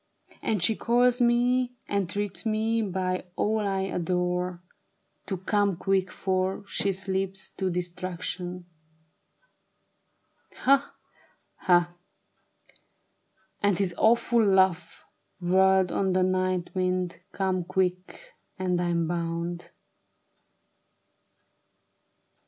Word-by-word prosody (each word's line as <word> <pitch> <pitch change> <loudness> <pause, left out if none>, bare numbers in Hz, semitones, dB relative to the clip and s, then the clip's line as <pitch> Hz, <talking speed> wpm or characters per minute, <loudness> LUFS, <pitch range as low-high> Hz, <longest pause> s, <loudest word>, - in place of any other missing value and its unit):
And 210 -6 0
she 220 +5 +4
calls 245 +2 +2
me, 245 +1 +2
entreats 200 0 -1
me, 225 +1 0
by 185 -2 -2
all 220 +1 +1
I 195 -2 -1
adore. 180 -1 -1 0.6
To 190 - -2
come 200 +1 +1
quick, 190 +1 0
for 190 +1 -1
she 200 0 0
slips 190 0 -3
to 190 -1 0
destruction. 180 0 -4 1.9
Ha! 275 +1 +2 0.6
ha! 175 -2 +3 0.9
" - - -44
And 205 -3 +2
his 190 -3 0
awful 235 +2 +3
laugh 190 -4 +2 0.3
whirled 190 +1 +3
on 190 -1 0
the 185 0 +3
night 185 -1 0
wind; 185 -1 -1
" - - -46
Come 185 -2 -1
quick! 185 - -3 0.2
And 180 -2 0
I'm 170 -1 0
bound. 170 0 -3
185 Hz, 95 wpm, -27 LUFS, 180-205 Hz, 1.9 s, she